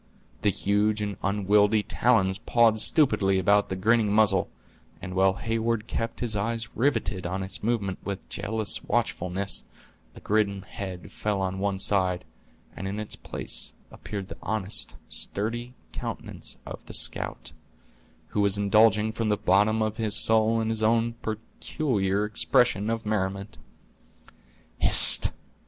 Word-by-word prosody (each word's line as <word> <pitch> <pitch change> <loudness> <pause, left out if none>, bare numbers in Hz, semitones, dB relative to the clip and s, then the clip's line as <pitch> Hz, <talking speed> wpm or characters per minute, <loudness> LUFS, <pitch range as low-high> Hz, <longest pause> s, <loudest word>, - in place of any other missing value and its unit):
The 105 - +3
huge 105 +2 0
and 100 -1 -3
unwieldy 105 +2 +2
talons 95 -6 +1
pawed 115 -2 +3
stupidly 105 - +4
about 100 +2 +2
the 95 - -2
grinning 110 +2 +2
muzzle, 105 0 +3 0.5
and 95 -1 -7
while 95 0 +3
Heyward 115 +1 -2
kept 115 0 -4
his 115 -3 -1
eyes 115 +2 -3
riveted 110 -8 0
on 95 +2 -3
its 95 +1 -5
movements 105 -4 -2
with 100 -1 -6
jealous 105 +1 -2
watchfulness, 95 -5 -1 0.5
the - - -11
grim 100 -2 0
head 95 -3 -8
fell 105 -2 -2
on 95 0 -2
one 100 0 -1
side 95 -2 0 0.5
and 95 - -5
in 100 +2 -4
its 110 - -6
place - - -4 0.2
appeared 100 -2 -7
the 80 - -10
honest 105 -1 -2
sturdy 120 +4 -3 0.2
countenance - - -6
of - - -9
the - - -7
scout, - - -1 0.8
who 105 - -1
was 100 0 +2
indulging 105 +1 +3
from 110 0 -2
the 105 - +1
bottom 105 +4 +2
of 110 0 -3
his 110 -3 -1
soul 110 0 +3
in 110 0 -1
his 110 -1 -2
own 115 +1 +2
peculiar 110 -2 -2
expression 105 0 +1
of 115 0 -3
merriment. 100 -1 -3 1.2
"Hist!" - - +8
105 Hz, 140 wpm, -26 LUFS, 95-110 Hz, 1.2 s, Hist